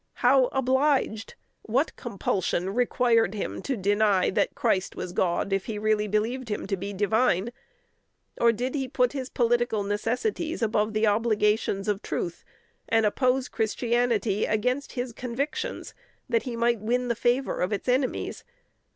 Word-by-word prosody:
How 260 +1 +6
obliged? 265 -3 0 0.3
What 260 +8 0
compulsion 190 -5 -2
required 235 -3 +2
him 205 - -4
to 270 -3 -2
deny 205 -1 +2
that - - 0
Christ 190 -1 0
was 180 - -5
God 185 +1 0
if 195 -1 0
he 220 -3 -4
really 210 0 +1
believed 225 +4 -1
him 210 - -3
to 195 - -1
be 200 +2 -5
divine? 210 +1 +1 0.9
Or 235 0 +5
did 245 +3 -3
he 270 -3 -2
put 250 0 +1
his 260 -2 -4
political 240 -3 +1
necessities 245 - -2
above 215 0 +1
the 215 +1 +2
obligations 210 -2 +1
of 205 -1 0
truth, 170 - -4 0.5
and 225 -1 +3
oppose 255 +4 +1
Christianity 230 -2 0
against 250 +6 -1
his 245 -2 -4
convictions, 275 - -4 0.3
that 460 - +1
he 235 - -4
might 235 0 +1
win 245 +4 0
the 235 - +1
favor 245 +4 0
of 180 +3 0
its 205 - -3
enemies? 255 +1 -1
230 Hz, 150 wpm, -26 LUFS, 210-250 Hz, 0.9 s, How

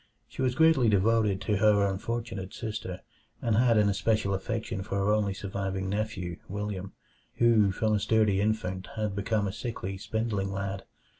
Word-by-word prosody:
She - - -7
was 125 -1 +1
greatly 160 -7 +5
devoted 105 -1 +2
to 105 -2 0
her 105 0 +4
unfortunate 100 0 -3
sister, 105 -5 -5 0.4
and 115 -2 +1
had 115 0 +4
an 105 -1 +4
especial 100 0 +1
affection 95 0 -3
for 95 - -4
her 100 +1 +2
only 100 -2 +1
surviving 95 -1 -3
nephew 100 -5 -3
William, 100 -1 -4 0.4
who 115 -4 +4
from 110 +3 0
a 105 - +2
sturdy 105 -2 +2
infant 95 -3 -1
had 105 -2 -2
become 100 0 0
a 95 - -4
sickly, 100 -5 -5
spindling 105 -2 -2
lad. 100 0 -4
105 Hz, 160 wpm, -28 LUFS, 95-110 Hz, 0.4 s, greatly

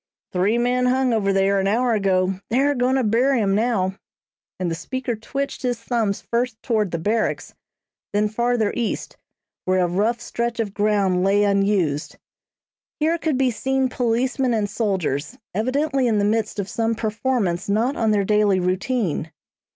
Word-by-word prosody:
"Three 195 +5 +2
men 250 +1 +1
hung 255 -1 +2
over 200 -3 +1
there, 195 0 +2
an 195 - 0
hour 235 +4 +2
ago. 190 -2 +1
They're 275 +5 +2
goin' 255 0 +1
to 265 - +2
bury 240 +4 +2
'em 200 -3 +1
now," 200 -3 0 0.6
and 180 -2 -1
the - - 0
speaker 245 +8 -3
twitched 275 +6 -4
his 245 -2 -1
thumbs 230 -4 -1
first 235 -1 -2
toward 215 -5 +1
the 170 - -2
Barracks, 215 +7 -1 0.6
then 210 +1 +2
farther 235 0 0
east, 235 -3 -3 0.5
where 185 0 +2
a 180 -1 +2
rough 210 +7 0
stretch 235 0 -3
of 210 -4 -2
ground 200 -3 +1
lay 200 +2 +3
unused. 195 -7 +1 0.8
Here 325 +2 +1
could 315 -5 0
be 260 -1 +2
seen 265 +2 0
policemen 250 +1 0
and 210 -2 0
soldiers, 195 - -2 0.2
evidently 265 - 0
in 220 -2 +2
the 200 - +2
midst 215 0 0
of 200 -2 -2
some 225 +2 -1
performance 215 -5 -1
not 230 +7 +1
on 225 -2 +1
their 205 -2 +2
daily 210 -2 +3
routine. 185 - -1
220 Hz, 165 wpm, -22 LUFS, 195-245 Hz, 0.8 s, lay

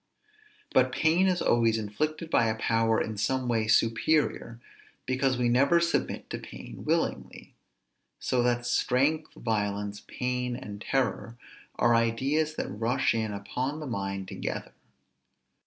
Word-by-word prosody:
But - - +4
pain 165 +4 +3
is 180 -1 +1
always 115 -1 +3
inflicted 155 +10 -3
by 115 - +4
a 110 - 0
power 115 0 +2
in 110 -1 -3
some 130 +5 0
way 115 -2 +1
superior, 115 +2 +2 0.5
because 130 0 +1
we 125 -1 +1
never 140 +8 +4
submit 170 0 -1
to - - -3
pain - - -10
willingly. - - -2 0.7
So 125 - +1
that 120 0 +1
strength, 140 +6 +1
violence, 105 -2 -2
pain, 125 -1 -2
and 105 -4 -8
terror, 120 -3 -1 0.4
are 120 - +3
ideas 135 +7 +1
that - - -3
rush 115 +5 +1
in 110 -2 -1
upon 125 +9 -3
the 155 - -6
mind 100 -5 -3
together. - - -5
120 Hz, 135 wpm, -28 LUFS, 110-135 Hz, 0.7 s, But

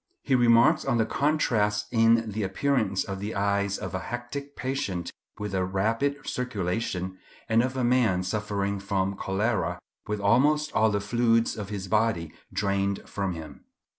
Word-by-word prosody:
He 135 - 0
remarks 120 +5 +5
on 135 -3 +1
the 110 - +3
contrast 110 -8 +1
in 115 -1 +3
the 110 +2 -3
appearance 100 0 0
of 95 -1 -5
the 105 +3 -4
eyes 100 0 +1
of - - -6
a 95 - -1
hectic 120 +7 -6
patient 115 -10 -3 0.3
with 105 -1 -5
a 95 -1 +1
rapid 115 +10 -1
circulation, 95 -5 -2 0.3
and 115 0 +4
of 130 +2 -2
a 130 - 0
man 120 -7 +3
suffering 100 0 -2
from 100 -1 -1
cholera 105 +3 -1 0.3
with 105 0 -2
almost 145 +9 +3
all 110 0 +4
the 100 -1 0
fluids 115 +2 +2
of 105 -2 -6
his 100 -2 -4
body 105 -6 +1 0.2
drained 100 -1 -1
from 100 -2 -2
him. 80 -1 -10
105 Hz, 160 wpm, -27 LUFS, 100-120 Hz, 0.3 s, remarks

